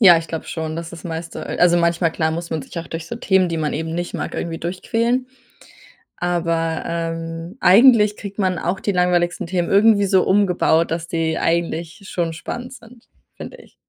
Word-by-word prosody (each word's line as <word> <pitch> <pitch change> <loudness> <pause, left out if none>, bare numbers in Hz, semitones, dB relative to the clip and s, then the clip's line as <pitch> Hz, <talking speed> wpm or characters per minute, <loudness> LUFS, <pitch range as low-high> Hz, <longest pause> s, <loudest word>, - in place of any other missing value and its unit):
Ja, 180 -6 +8
ich 165 - -7
glaube 160 - -5
schon, 160 -1 -4
dass 165 0 -6
das 170 0 -11
meiste 165 0 -5
also, 175 0 +3
manchmal 170 0 +2
klar 160 -1 0
muss 170 +1 -5
man 160 -2 -2
sich 170 - -8
auch 165 - -7
durch 165 0 -6
so - - -5
Themen, 190 -5 +2
die 165 - -2
man 155 -2 -1
eben 160 +2 -3
nicht 175 +1 -4
mag, - - -4
irgendwie 165 -1 -4
durchquälen. 230 +8 -1 0.9
Aber, 165 -2 -1
ähm, 165 +2 -4
eigentlich 210 +2 +6
kriegt 200 0 -8
man 185 -2 +1
auch 185 +3 -2
die 205 - -1
langweiligsten 175 -1 +1
Themen 175 -1 -1
irgendwie 205 0 +5
so 190 -1 +3
umgebaut, 180 -4 +2
dass 165 0 -3
die 165 -1 -1
eigentlich 170 +2 -1
schon 170 -2 -2
spannend 245 +10 -6
sind, 235 -1 -16 0.3
finde - - -9
ich. - - -18
175 Hz, 190 wpm, -20 LUFS, 165-190 Hz, 0.9 s, Ja